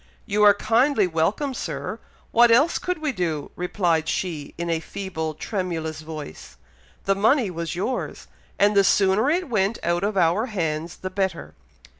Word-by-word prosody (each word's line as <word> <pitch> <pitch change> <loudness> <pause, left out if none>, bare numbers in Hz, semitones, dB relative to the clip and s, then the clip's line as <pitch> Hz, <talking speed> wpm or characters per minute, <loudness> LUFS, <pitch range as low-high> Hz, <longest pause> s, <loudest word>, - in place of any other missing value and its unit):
"You 210 0 0
are 205 -1 +7
kindly 230 +2 +2
welcome, 180 - 0
Sir! - - -5 0.3
What 240 +1 +6
else 280 +9 +4
could 360 0 -2
we 310 -2 -1
do!" 165 - -3
replied 175 -3 0
she, 160 -6 -3
in 170 - -3
a 165 -1 0
feeble, 160 -3 -5
tremulous 165 -5 -3
voice. 155 - -9 0.5
"The 195 - +2
money 220 +2 +2
was 170 0 -4
yours, 225 +9 -3 0.3
and 205 +1 +3
the 200 - +6
sooner 195 +6 +3
it 355 +3 0
went 215 -3 0
out 175 +2 0
of 205 0 -1
our 180 +7 +2
hands 165 -5 -3
the 185 - -6
better." 185 - -2
190 Hz, 160 wpm, -24 LUFS, 165-220 Hz, 0.5 s, are